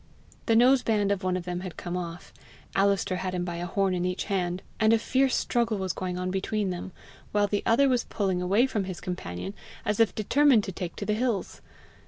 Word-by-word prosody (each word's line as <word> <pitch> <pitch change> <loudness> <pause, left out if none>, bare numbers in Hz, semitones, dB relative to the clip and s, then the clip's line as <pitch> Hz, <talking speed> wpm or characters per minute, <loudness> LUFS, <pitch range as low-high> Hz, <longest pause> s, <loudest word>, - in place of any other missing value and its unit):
The 225 - +4
nose 250 +3 +6
band 210 -4 +1
of 200 -1 0
one 185 0 0
of 180 - -5
them 180 -1 -3
had 185 -2 -7
come 175 0 -4
off, 175 -1 -6 0.4
Alister 195 -1 +2
had 185 0 -3
him 175 0 -1
by 175 -1 -4
a 175 +1 -3
horn 195 0 +1
in 180 -1 -1
each 180 +1 -1
hand, 180 -2 -2 0.2
and 220 0 +5
a - - +6
fierce 260 +3 +2
struggle 235 -3 +1
was 190 -2 -2
going 180 -1 -3
on 180 0 -2
between 195 +1 -1
them, 180 +1 -5 0.4
while 205 0 +3
the 205 0 -1
other 265 +5 +5
was 250 -3 +1
pulling 190 -4 -1
away 200 +7 +3
from 215 -7 -1
his 185 -2 -6
companion 180 - -5 0.3
as 210 0 0
if 225 -2 +3
determined 255 +1 +4
to 195 - -4
take 175 -1 -5
to - - -5
the 210 - +1
hills. 225 -2 -2
195 Hz, 225 wpm, -27 LUFS, 180-220 Hz, 0.4 s, nose